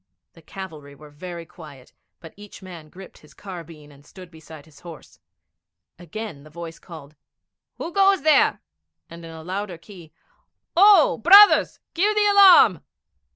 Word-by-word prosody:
The 165 - -20
cavalry 155 -5 -12
were 150 +1 -17
very 170 +2 -11
quiet, 150 -6 -17 0.3
but 165 -2 -15
each 205 -1 -15
man 170 -5 -13
gripped 190 +3 -16
his 150 - -22
carbine 165 -6 -13
and 140 0 -21
stood 180 +3 -16
beside 160 -2 -16
his 150 -3 -21
horse. 170 -4 -15 0.8
Again 180 -2 -10
the 155 - -17
voice 165 +1 -11
called, 155 -4 -15 0.6
'Who 335 - -8
goes 390 -4 +1
there?' 310 -2 +1 0.5
and 170 0 -13
in 165 - -12
a 160 -1 -12
louder 185 +1 -7
key, 170 -2 -17 0.6
'O, 380 - +4
brothers, 400 - +5
give 410 +5 -1
the 420 0 +1
alarm!' 385 - +5
170 Hz, 150 wpm, -21 LUFS, 155-215 Hz, 0.8 s, brothers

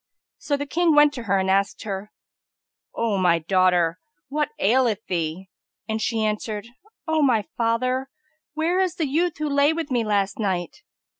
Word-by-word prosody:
So 285 - -1
the 285 - -3
King 330 +1 +2
went 295 0 +6
to 245 - -6
her, 200 -1 +2
and 190 0 0
asked 195 +1 +1
her, 205 0 -5 0.8
"O 220 -4 0
my 175 -2 +4
daughter, 180 0 +2 0.3
what 300 +2 -1
aileth 225 -1 +2
thee?"; 175 +1 -3 0.4
and 220 0 -2
she 220 0 0
answered, 210 0 -3 0.4
"O 315 -1 +2
my 245 -7 +3
father, 255 +3 0 0.5
where 335 +4 +1
is 370 -3 +1
the 320 - -1
youth 325 +4 0
who 305 - -2
lay 285 +2 +3
with 325 -3 -4
me 240 -2 +1
last 200 -2 0
night?" 185 -5 -2
225 Hz, 165 wpm, -23 LUFS, 195-290 Hz, 0.8 s, went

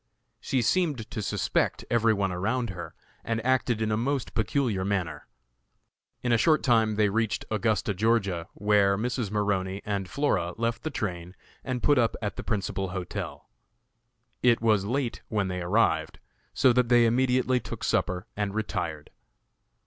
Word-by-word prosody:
She 130 -3 0
seemed 145 -4 0
to 110 - -3
suspect 105 -1 0
every 115 -1 +4
one 100 -3 0
around 110 +6 -1
her, 90 -2 -8 0.3
and 115 -1 -1
acted 125 -3 +1
in 110 - -1
a 105 - +1
most 135 +2 -1
peculiar 110 -3 0
manner. 95 -4 -2 1.0
In 125 - +1
a 115 - +4
short 155 +4 +3
time 110 -4 +3
they 105 0 +3
reached 110 +1 -1
Augusta, 110 -2 +1
Ga., 100 -4 +1
where 100 -1 +3
Mrs. 120 0 -2
Maroney 100 -2 -1
and 100 -3 -2
Flora 90 -12 0
left 115 0 -1
the 155 - -3
train 90 - -4 0.3
and 130 -2 -3
put 145 -3 +4
up 115 -1 +2
at 105 -2 -3
the - - -5
principal 95 -3 -2
hotel. 90 -1 -5 0.9
It 120 -2 +4
was 110 -4 +2
late 125 +2 -2
when 100 -3 -1
they 90 0 -3
arrived, 85 -4 +1 0.3
so 130 - +4
that 125 -1 +2
they 120 -1 +6
immediately 125 +1 +2
took 115 - -7
supper 90 +1 0
and 105 -1 -2
retired. 90 -8 -3
110 Hz, 155 wpm, -27 LUFS, 95-120 Hz, 1.0 s, they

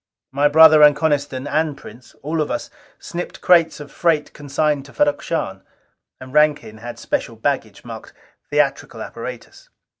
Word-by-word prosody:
My 140 +2 +2
brother 155 +1 +7
and 150 -1 +7
Coniston 145 -3 -1
and 150 0 -1
Prince 120 -2 -14
all 155 +2 -1
of 150 - -2
us - - -4 0.3
snipped 175 +1 -7
crates 170 -3 +3
of 145 -1 -10
freight 160 -4 0
consigned 145 0 -1
to 140 - -15
Ferrok 145 +4 +1
Shahn; 95 - -3 0.6
and 130 0 -11
Rankin 150 -8 +2
had 120 +1 -8
special 290 - -3
baggage - - -3
marked - - -9 0.4
'theatrical - - -1
apparatus.'" - - -9
150 Hz, 150 wpm, -20 LUFS, 140-160 Hz, 0.6 s, brother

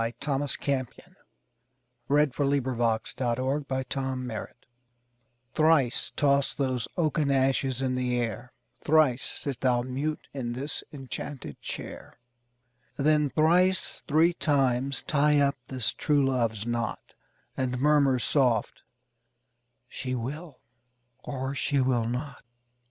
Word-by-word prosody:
Thomas 140 -1 -1
Campion 130 -4 -3 0.9
Thrice 145 +1 +4
Toss 145 - +1 0.7
Those 130 - -2
Oaken 135 +3 0
Ashes 140 - -15
in 130 -1 -3
the 110 - -3
Air - - -10 1.0
THRICE 155 -6 +3
toss 140 -1 +2
those 130 -4 -1
oaken 155 -3 +1
ashes 135 -1 +1
in 130 -1 0
the 125 -1 0
air; 120 +1 -4 0.3
Thrice 150 -5 +4
sit 140 -4 -4
thou 125 -2 +2
mute 140 +5 -3
in 120 -4 -3
this 140 +4 -3
enchanted 135 - -7
chair; - - -7 0.8
Then 150 0 +3
thrice 180 +5 +2
three 160 +4 +4
times 135 -4 +1
tie 150 0 +3
up 140 -1 +2
this 130 -4 -1
true 145 -3 +2
love's 115 -5 0
knot, 120 -2 -3 0.4
And 125 -1 -1
murmur 140 -2 +4
soft: 125 -4 +1 1.1
"She 130 0 -4
will, 140 +6 -6 0.6
or 135 -1 -4
she 140 +2 0
will 125 -3 +1
not." 125 +3 -5
135 Hz, 120 wpm, -27 LUFS, 125-145 Hz, 1.1 s, Thrice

